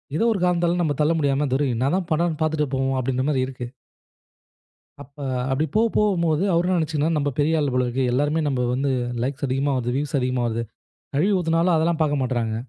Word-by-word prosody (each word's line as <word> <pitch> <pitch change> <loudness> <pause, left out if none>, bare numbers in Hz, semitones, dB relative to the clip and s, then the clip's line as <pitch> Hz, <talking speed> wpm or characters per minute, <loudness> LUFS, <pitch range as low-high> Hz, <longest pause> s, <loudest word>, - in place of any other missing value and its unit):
ஏதோ 225 - +1
ஒரு 195 - -3
காரணத்தால 175 0 +1
நம்ம 145 -4 0
தள்ள 150 - +3
முடியாம 140 0 +1
"துரை 140 +1 +1
என்ன 130 +5 0
தான் 180 -3 -3
பன்றாருனு 160 0 0
பார்த்துட்டு 150 -3 0
போவோம்" 135 0 0
அப்படின்ற 130 +1 -1
மாரி 130 -3 +1
இருக்கு. 125 -2 -6 1.3
அப்ப 140 +3 -15 0.3
அப்படி 150 +4 +1
போ 220 - +5
போவும்போது 170 -5 +2
அவரு 170 +1 +2
என்ன 185 -1 +2
நினைச்சிக்கினான்ன 155 0 0
நம்ம 145 0 0
பெரிய 155 +2 +2
ஆள் 145 -3 0
போல 125 0 +2
இருக்கு. 125 +2 -1
எல்லோருமே 145 +5 +1
நம்ப 130 -3 0
வந்து 135 +2 0 0.3
லைக்ஸ் 140 +2 -2
அதிகமா 135 +2 0
வருது, 120 0 -2
வியூஸ் 145 0 -1
அதிகமா 125 -1 -1
வருது. 115 0 -2 0.5
கழுவி 190 +8 +2
ஊத்துனாலும் 165 +1 +2
அதெல்லாம் 160 0 +1
பாக்க 145 -1 +2
மாட்றாங்க. 120 -3 -1
145 Hz, 195 wpm, -23 LUFS, 130-165 Hz, 1.3 s, போ